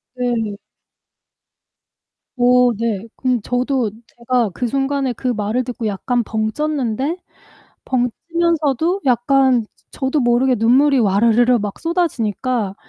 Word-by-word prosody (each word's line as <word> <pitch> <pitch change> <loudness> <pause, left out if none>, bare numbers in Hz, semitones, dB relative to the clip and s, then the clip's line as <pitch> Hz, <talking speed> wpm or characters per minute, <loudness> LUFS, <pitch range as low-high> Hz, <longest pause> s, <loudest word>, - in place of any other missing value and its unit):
네. 235 -5 -2 1.8
오 250 0 +5
네. 225 -2 -2
그럼 250 -4 0
저도 250 0 -1 0.2
제가 240 -2 -1
그 245 - -2
순간에 275 +1 -1
그 255 - -5
말을 220 +2 -1
듣고 240 -2 -4
약간 235 +4 -1
벙쪘는데 260 - -2 0.7
벙찌면서도 325 - 0
약간 255 0 +3 0.3
저도 270 +2 -1
모르게 245 +1 +2
눈물이 265 +5 +4
와르르르 230 +4 +3
막 205 -2 -5
쏟아지니까 255 - -1
245 Hz, 230 characters per minute, -19 LUFS, 230-270 Hz, 1.8 s, 오